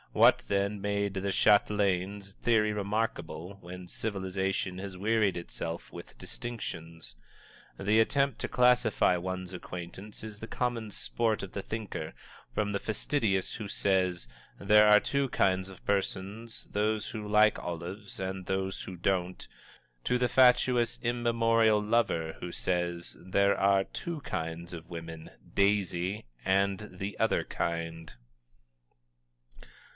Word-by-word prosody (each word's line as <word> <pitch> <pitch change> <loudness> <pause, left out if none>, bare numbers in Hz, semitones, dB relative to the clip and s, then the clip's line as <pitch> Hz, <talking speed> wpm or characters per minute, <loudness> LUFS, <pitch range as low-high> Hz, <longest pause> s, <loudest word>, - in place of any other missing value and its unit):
What, - - +6
then, 100 +1 0
made 100 0 0
the 95 0 -1
Chatelaine's 100 -1 +2
theory 110 -2 +3
remarkable, 100 -3 -3
when 90 +1 -9
Civilization 95 -2 -2
has 95 -1 -6
wearied 105 -1 +2
itself 85 -1 -6
with - - -10
distinctions? 80 - -6 0.6
The 105 +3 +3
attempt 140 +4 +2
to - - -3
classify 125 -6 +4
one's 95 +1 -4
acquaintance 90 +3 -7
is 110 -2 -8
the 110 - -7
common 120 -3 -2
sport 110 +1 -1
of 95 - -7
the 100 - -3
thinker, 105 -7 -5 0.4
from 105 -1 0
the 100 - 0
fastidious 110 -3 0
who 105 -3 -6
says: 90 -9 +1 0.3
"There 105 +1 +6
are 105 0 +8
two 140 +2 0
kinds 95 -3 +1
of 95 - -14
persons 100 +3 -2
those 105 +1 0
who 110 -2 -5
like 105 +1 +5
olives 90 +5 -6
and 95 -1 -4
those 95 0 -1
who 95 - -7
don't," 90 0 -1 0.6
to 125 - +2
the 125 0 +2
fatuous, 125 -2 +4
immemorial 115 -2 +3
lover 105 -7 +1
who 90 - -4
says: 85 -1 -2
"There 100 +2 +3
are 100 0 +3
two 170 -2 -5
kinds 85 -4 -4
of 85 0 -8
women 80 -2 -7 0.2
Daisy, 100 - +1 0.2
and 100 +2 +1
the 95 +3 -5
Other 110 - +2
Kind!" 80 -1 -3
100 Hz, 130 wpm, -30 LUFS, 90-110 Hz, 0.6 s, are